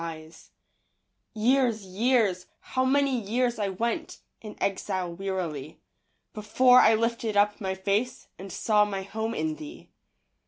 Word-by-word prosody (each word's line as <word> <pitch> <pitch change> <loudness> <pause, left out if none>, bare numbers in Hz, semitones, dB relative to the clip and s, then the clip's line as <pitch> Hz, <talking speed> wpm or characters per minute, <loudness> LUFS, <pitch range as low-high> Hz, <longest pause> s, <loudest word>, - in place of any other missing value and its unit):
Years, 235 -1 +2
years, 200 -2 +1
how 260 - -2
many 275 -1 +2
years 240 +3 -1
I 205 - 0
went 230 +5 -3 0.2
In 215 -1 -9
exile 190 -2 -2
wearily, 170 -6 -5 0.5
Before 250 +4 +4
I 220 +1 +6
lifted 230 -1 -1
up 205 +1 +2
my 190 -1 -2
face 205 +6 -2
And 195 0 -8
saw 210 +3 +2
my 195 -2 -3
home 220 +3 -4
in 315 -1 -2
thee. 315 +2 -11
215 Hz, 125 wpm, -27 LUFS, 195-245 Hz, 0.5 s, I